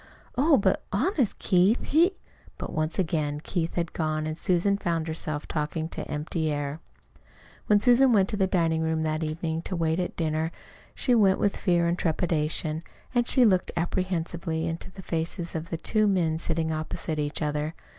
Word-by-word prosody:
"Oh, 285 +3 +5
but 195 -2 +2
honest, 260 - +1
Keith, 190 +5 +3
he 340 +6 +3 0.2
" - - -26
But - - -6
once 155 +1 -1
again 155 -5 0
Keith 165 +1 -2
had 170 -1 -2
gone 155 -1 -1
and 155 0 -3
Susan 180 +4 +2
found 165 -4 -1
herself 155 -2 -4
talking 155 +1 -2
to - - -6
empty 155 +1 -2
air. 145 +1 -3 0.9
When 210 -1 +5
Susan 245 +4 +5
went 200 -4 +4
into - - 0
the 190 -1 +2
dining 165 -3 +1
room 160 0 0
that 155 0 -1
evening 160 +1 -2
to 185 - -4
wait 165 0 0
at 180 - -2
dinner, 160 0 -1 0.4
she 250 - +1
went 200 -5 +5
with 200 - +1
fear 175 -3 +2
and 170 +1 0
trepidation, 160 -1 -1 0.3
and 240 -1 +2
she 255 - +5
looked 185 -4 +3
apprehensively 170 -2 -1
into 165 +3 -4
the 190 +1 -11
faces 165 +1 -3
of 160 +1 -4
the 165 - -2
two 215 +5 +1
men 170 -5 +1
sitting 160 -1 0
opposite 155 0 -3
each 150 +1 -2
other. 150 +2 -2
165 Hz, 180 wpm, -27 LUFS, 155-190 Hz, 0.9 s, Oh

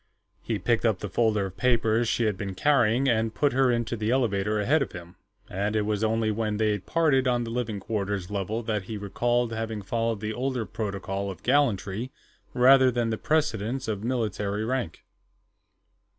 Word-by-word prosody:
He 115 - -2
picked 115 +4 0
up 110 -5 +2
the 105 - -6
folder 105 0 +1
of 95 0 -8
papers 115 0 +2
she 120 - +1
had 105 -3 +1
been 95 0 -5
carrying, 130 0 +3
and 110 -2 +1
put 145 -3 +2
her 130 0 +3
into 120 -1 0
the 110 -1 -2
elevator 105 -4 +1
ahead 140 +9 +2
of 125 - -3
him, 85 0 -10 0.3
and 100 +3 -2
it 105 - +2
was 105 0 -1
only 110 0 +1
when 105 -1 -1
they 105 -1 +1
parted 135 - +2
on 120 -1 +1
the 115 - -5
living 115 -4 -2
quarters 100 -3 -3
level 105 +3 -2
that 105 -4 -2
he 110 +2 -5
recalled 120 +4 0
having 110 -2 -4
followed 115 +1 -1
the 110 +1 -3
older 125 -1 -2
protocol 100 -2 -4
of 95 - -9
gallantry 120 -4 +1 0.5
rather 130 +1 +6
than 120 -2 0
the 110 - -1
precedence 130 -5 0
of 105 -2 -3
military 110 -4 -1
rank. 125 -8 -3
110 Hz, 180 wpm, -26 LUFS, 105-120 Hz, 0.5 s, rather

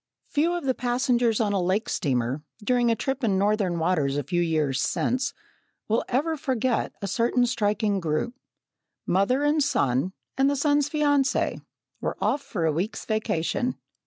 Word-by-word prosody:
Few 315 +4 +2
of 350 - -3
the 265 -1 +1
passengers 245 -2 +1
on 210 -3 +1
a 195 - +1
lake 190 +5 0
steamer, 130 - -1 0.2
during 245 +1 +2
a 230 - +3
trip 270 +3 -3
in 200 -4 +2
northern 200 -3 +1
waters 160 -5 +1
a 145 - -1
few 175 +6 0
years 155 -6 +1
since, 255 +2 0 0.5
will 225 +2 +1
ever 305 +6 +1
forget 260 -4 0
a - - -1
certain 235 +4 +2
striking 210 -3 0
group. 165 +8 -1 0.7
Mother 200 +10 +2
and 295 +1 +3
son, 140 - +1 0.3
and 270 +1 +5
the 285 - +1
son's 290 0 +2
fiancée, 290 -2 +1 0.4
were - - -2
off 285 - +1
for 170 -10 -3
a 160 - +3
week's 185 +8 -3
vacation. 220 +2 -1
225 Hz, 160 wpm, -26 LUFS, 175-265 Hz, 0.7 s, and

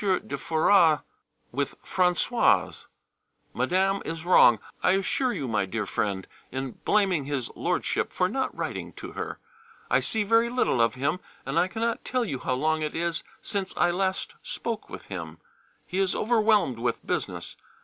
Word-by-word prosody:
de 190 -8 0
Foras 160 +2 +4 0.5
with 140 +2 -3
Françoise. 180 +6 +2 0.7
Madame 195 +2 +1
is 165 0 -5
wrong, 120 -10 +7 0.2
I 180 - +4
assure 220 +7 +1
you, 135 - -3
my 105 -4 0
dear 110 +2 -2
friend, 100 -2 -2 0.3
in 130 0 -3
blaming 190 -8 +2
his 140 -4 -2
Lordship[B] - - -1
for - - +1
not - - -2
writing - - -4
to - - -8
her. - - -5 0.5
I 125 - +5
see 210 - +1
very 230 +3 +3
little 240 - +2
of 115 -1 +2
him, 145 +7 0 0.3
and - - +1
I 180 - +3
cannot 230 +3 -2
tell 255 -2 0
you 135 - -3
how 130 - -1
long 155 +4 +1
it 155 -1 -3
is 170 0 -1 0.2
since 195 -2 -3
I 175 - +4
last 190 +1 -1
spoke 230 -2 -4
with - - -9
him: 85 -4 -6 0.5
he 185 - -3
is 190 -2 +1
overwhelmed 215 - +3
with 120 +1 -2
business. - - -3
175 Hz, 160 wpm, -27 LUFS, 130-200 Hz, 0.7 s, wrong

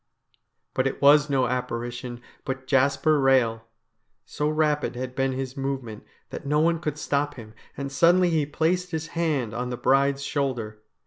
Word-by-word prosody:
But 130 +1 +1
it 135 - -4
was 145 +1 +6
no 135 -2 +2
apparition, 120 0 -4 0.2
but 130 0 -5
Jasper 140 +3 +3
Eehel. 130 -4 +3 0.6
So 150 +1 -2
rapid 150 -3 0
had 125 0 -5
been 135 0 0
his 130 0 -4
movement 135 -5 -4 0.3
that - - -6
no 150 +2 +1
one 165 +1 +2
could 150 -2 -3
stop 145 -1 -1
him, 110 -4 -11 0.2
and 140 0 -4
suddenly 175 +5 +4
he 155 -3 +1
placed 175 +4 0
his 160 -1 -4
hand 150 -10 -1
on 125 +2 -3
the 125 - -4
bride's 140 +2 +2
shoulder. 120 -7 -3
135 Hz, 165 wpm, -25 LUFS, 125-150 Hz, 0.6 s, was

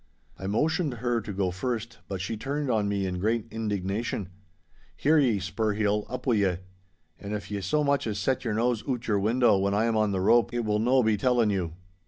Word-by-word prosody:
I 95 - -4
motioned 150 - 0
her 120 0 -1
to 105 - -6
go 95 -2 -1
first, 115 +3 -4
but 95 -2 -4
she 95 +4 -3
turned 140 +4 -2
on 105 -3 +1
me 100 -1 0
in 90 -1 -3
great 110 +3 0
indignation. 105 -2 -2 0.7
'Hear 155 +2 +4
ye, 125 -7 +3
Spurheel, 105 +2 -1
up 125 0 -5
wi' 125 -4 +3
ye! 95 -4 +2 0.6
And 105 +1 -4
if 105 0 -7
ye 100 -1 -2
so 150 - +1
much 140 -3 +1
as 105 -2 -2
set 125 +6 0
your 115 -4 -1
nose 120 0 +1
oot 125 -2 -2
o' - - -2
your 100 - +3
window 110 0 +3
when 100 +1 +1
I 110 +2 +2
am 115 -1 +1
on 110 -1 +2
the 95 -2 -1
rope, 115 +5 +3
it 120 -1 -1
will 105 0 +1
no 125 +3 +3
be 110 -1 +2
telling 120 -1 +2
you. 90 -5 -2
110 Hz, 225 wpm, -27 LUFS, 100-120 Hz, 0.7 s, Hear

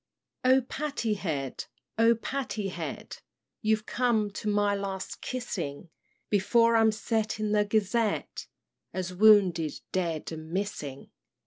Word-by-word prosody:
"O 260 +1 +5
Patty 265 -3 -2
Head, 150 -10 -3 0.3
O 230 +1 +6
Patty 230 -4 -3
Head, - - -6 0.4
You're 215 -1 +2
come 225 -4 +1
to 210 +1 -3
my 205 0 +2
last 195 -1 -4
kissing; 175 - -4 0.4
Before 230 +3 +4
I'm 225 -1 +5
set 220 0 -1
in 215 -1 -1
the 210 0 +3
Gazette 215 +1 0 0.5
As 185 -1 -3
wounded, 185 -6 +5
dead, 170 -5 -2
and 160 0 -7
missing! 165 -7 -4
210 Hz, 120 wpm, -28 LUFS, 185-225 Hz, 0.5 s, O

